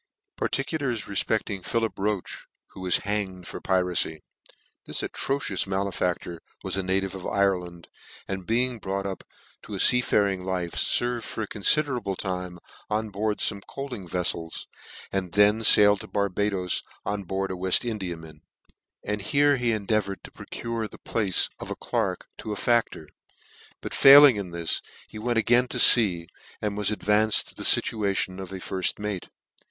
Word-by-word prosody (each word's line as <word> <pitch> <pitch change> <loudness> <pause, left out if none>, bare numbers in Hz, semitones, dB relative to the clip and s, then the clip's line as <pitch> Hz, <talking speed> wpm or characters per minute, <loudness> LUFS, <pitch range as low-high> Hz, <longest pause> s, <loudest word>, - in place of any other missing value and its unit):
'* 410 0 -49
Particulars 135 -9 -2
refpecting 100 -1 -2
PHILIP 115 -3 -2
ROCHE, 100 -1 -3 0.2
who - - -12
was 90 -1 +2
hanged 100 -3 -3
for - - -7
Piracy. 90 -4 0 0.6
THIS - - -3
atrocious 135 -9 -2
malefactor 90 -3 -2 0.2
was - - -2
a 95 - 0
native 95 +1 -1
of 95 -2 -6
Ireland, 90 -4 -1 0.4
and 95 -2 -5
being 120 +1 0
brought 100 -1 -3
up 95 -1 -5 0.4
to - - -8
a - - -5
fea 125 - +5
faring 100 -5 +1
life, 90 -2 -3
ferved 120 -1 +1
for 110 - -5
aconfiderable 115 -1 +1
time 90 -2 -4 0.3
on 110 0 -2
board 105 +2 -1
jTome 100 - -1
coafting 125 -9 -7
veffels, 85 -1 -2 0.5
and 95 -3 -3
then 105 +2 +4
failed 105 -2 +6
to - - -9
Barba 100 0 0
does 90 -3 0 0.2
on 100 -1 -3
board 95 +1 -3
a - - -3
We.ft 95 +5 +2
Indiaman; 85 -8 -6 0.6
and 105 0 -3
here 145 +6 +3
he 120 -2 +1
en 105 -3 -2
deavoured 100 -2 -1
to - - -12
procure 115 -1 -5
the - - -14
place 105 -5 +1
of - - -7
clerk - - -2
to 110 - -6
a - - -2
fac 120 +2 +2
tor; 80 - -11 0.8
but - - -6
failing 140 -2 +9
in 100 -3 -5
this, 85 -1 -2 0.3
he 110 - -9
went 120 +1 -1
again 120 +2 +3
to - - -3 0.2
lea, 95 -8 0 0.3
and 105 -1 -3
was 105 -1 +2
advanced 105 0 +2
to - - -9
the - - -10
ftation 100 -3 +2
of 95 - -8
a - - -6
firft 95 0 -1
mate. 105 -3 -5
100 Hz, 165 wpm, -25 LUFS, 95-110 Hz, 0.8 s, failing